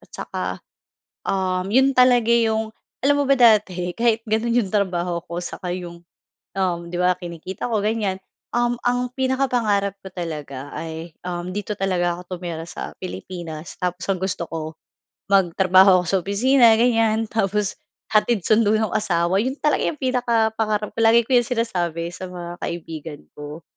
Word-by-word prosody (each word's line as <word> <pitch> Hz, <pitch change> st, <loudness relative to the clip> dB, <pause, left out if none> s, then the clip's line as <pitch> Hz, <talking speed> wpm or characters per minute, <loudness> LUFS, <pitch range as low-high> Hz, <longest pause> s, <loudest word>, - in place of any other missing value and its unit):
saka, -, -, -5 dB, 0.8 s
um, 185 Hz, -1 st, 0 dB
'yon 265 Hz, +3 st, +4 dB
talaga 250 Hz, -2 st, +5 dB
'yong 220 Hz, -2 st, +2 dB, 0.2 s
alam 285 Hz, +2 st, +3 dB
mo -, -, +3 dB
ba 275 Hz, 0 st, +3 dB
dati 195 Hz, -7 st, +3 dB
kahit 230 Hz, -1 st, +2 dB
gano'n 220 Hz, +2 st, 0 dB
'yong 215 Hz, -, -1 dB
trabaho 175 Hz, -4 st, 0 dB
ko 170 Hz, 0 st, -5 dB
saka 180 Hz, 0 st, -5 dB
'yong, 175 Hz, -1 st, -7 dB, 0.6 s
um, 180 Hz, -3 st, +1 dB
'di 175 Hz, -, -3 dB
ba 180 Hz, 0 st, +3 dB
kinikita 175 Hz, +3 st, -6 dB
ko 220 Hz, -, +2 dB
ganyan 205 Hz, -2 st, -1 dB, 0.4 s
um, 240 Hz, 0 st, +2 dB
ang 245 Hz, 0 st, +1 dB
pinakapangarap 245 Hz, -7 st, +1 dB
ko 190 Hz, -, -8 dB
talaga 150 Hz, -6 st, -6 dB
ay, 160 Hz, +1 st, -6 dB, 0.2 s
um, 175 Hz, 0 st, -4 dB
dito 205 Hz, 0 st, -3 dB
talaga 180 Hz, -3 st, 0 dB
ako 180 Hz, 0 st, -7 dB
tumira 165 Hz, -2 st, -5 dB
sa -, -, -6 dB
Pilipinas 175 Hz, -3 st, -7 dB
tapos 180 Hz, 0 st, -2 dB
ang 190 Hz, -, -2 dB
gusto 190 Hz, -2 st, -2 dB
ko 160 Hz, -1 st, -5 dB, 0.6 s
magtrabaho 185 Hz, 0 st, +5 dB
ako -, -, -9 dB
sa 195 Hz, -, +3 dB
opisina 230 Hz, +5 st, +5 dB
ganyan 225 Hz, -2 st, +2 dB
tapos 210 Hz, -2 st, 0 dB, 0.4 s
hatid 215 Hz, -1 st, +3 dB
sundo 215 Hz, -1 st, +4 dB
no'ng 220 Hz, 0 st, -1 dB
asawa. 180 Hz, -3 st, +1 dB
'Yon 265 Hz, +4 st, -3 dB
talaga 300 Hz, -, +2 dB
'yong 300 Hz, -, -4 dB
pinakapangarap 225 Hz, -4 st, 0 dB
ko. -, -, -14 dB
Lagi 225 Hz, +1 st, +6 dB
ko 260 Hz, -, +1 dB
'yong 240 Hz, -, -1 dB
sinasabi 175 Hz, -9 st, -1 dB
sa 185 Hz, -, -6 dB
mga 175 Hz, -1 st, -7 dB
kaibigan 160 Hz, -3 st, -6 dB
ko. 150 Hz, +2 st, -8 dB
195 Hz, 155 wpm, -22 LUFS, 175-230 Hz, 0.8 s, Lagi